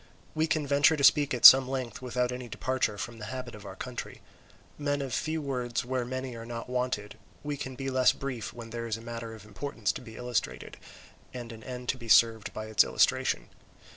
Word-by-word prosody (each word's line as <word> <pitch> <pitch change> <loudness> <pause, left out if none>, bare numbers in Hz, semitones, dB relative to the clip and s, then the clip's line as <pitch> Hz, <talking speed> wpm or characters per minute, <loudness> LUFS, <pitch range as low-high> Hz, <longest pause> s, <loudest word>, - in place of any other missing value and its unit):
We 155 +1 +1
can 155 -2 0
venture 145 +2 +4
to 140 - -2
speak 145 +1 +5
at 125 - +1
some 130 -1 +11
length 130 -3 -4
without 125 0 -1
any 125 0 -6
departure 130 -2 -1
from 115 +4 -6
the 105 - -6
habit 130 0 -6
of 105 -1 -10
our - - -8
country. - - -7 0.6
Men 145 -1 0
of 135 -2 -4
few 160 -1 -2
words 125 -4 -2
where 130 -1 -1
many 130 0 -5
are 115 - -7
not 115 0 -6
wanted, 125 -5 -3 0.2
we 145 0 -3
can 130 -2 -6
be 135 +1 -4
less 130 -1 +5
brief 130 -5 -5
when 115 -1 -10
there 115 0 -4
is 115 -1 -2
a - - -11
matter 115 -1 -6
of 105 -2 -13
importance 115 +1 -3
to - - -8
be 110 -3 -11
illustrated 125 -1 -3 0.6
and 120 -2 -6
an 110 -1 -11
end 125 0 -7
to 130 - 0
be 115 -2 -9
served 115 -2 +5
by 110 - -6
its 110 0 +4
illustration. - - +1
125 Hz, 215 wpm, -29 LUFS, 115-135 Hz, 0.6 s, some